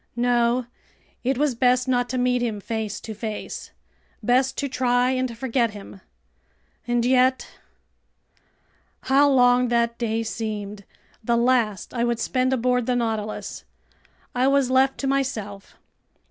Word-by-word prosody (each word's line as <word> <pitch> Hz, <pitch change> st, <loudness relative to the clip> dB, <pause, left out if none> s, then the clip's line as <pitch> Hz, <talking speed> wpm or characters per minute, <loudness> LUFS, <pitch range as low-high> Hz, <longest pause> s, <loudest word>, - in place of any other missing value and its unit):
No! 240 Hz, 0 st, +2 dB, 0.6 s
It 260 Hz, +1 st, 0 dB
was 290 Hz, -1 st, +1 dB
best 250 Hz, +1 st, +2 dB
not 245 Hz, -1 st, +1 dB
to 255 Hz, -, -2 dB
meet 250 Hz, 0 st, +1 dB
him 225 Hz, -4 st, -2 dB
face 220 Hz, 0 st, -4 dB
to 220 Hz, -, -7 dB
face! 215 Hz, 0 st, -6 dB, 0.5 s
Best 255 Hz, +3 st, +2 dB
to 280 Hz, -, -1 dB
try 250 Hz, -2 st, +1 dB
and 255 Hz, -3 st, -2 dB
forget 235 Hz, -3 st, 0 dB
him! 200 Hz, -1 st, -11 dB, 0.9 s
And 240 Hz, -1 st, +1 dB
yet...! 255 Hz, +1 st, +3 dB, 1.5 s
How 280 Hz, +2 st, +4 dB
long 250 Hz, -2 st, +4 dB
that 235 Hz, 0 st, 0 dB
day 230 Hz, -1 st, -1 dB
seemed, 210 Hz, -2 st, -5 dB, 0.4 s
the 235 Hz, +1 st, +1 dB
last 235 Hz, -5 st, +1 dB
I 235 Hz, -2 st, -1 dB
would 235 Hz, -1 st, 0 dB
spend 255 Hz, +2 st, 0 dB
aboard 250 Hz, -1 st, +1 dB
the 250 Hz, -, +1 dB
Nautilus! 220 Hz, -3 st, -3 dB, 0.7 s
I 255 Hz, +1 st, +2 dB
was 275 Hz, -2 st, +2 dB
left 265 Hz, +1 st, +3 dB
to 275 Hz, -, -1 dB
myself. 235 Hz, -8 st, -3 dB
245 Hz, 135 wpm, -23 LUFS, 225-255 Hz, 1.5 s, How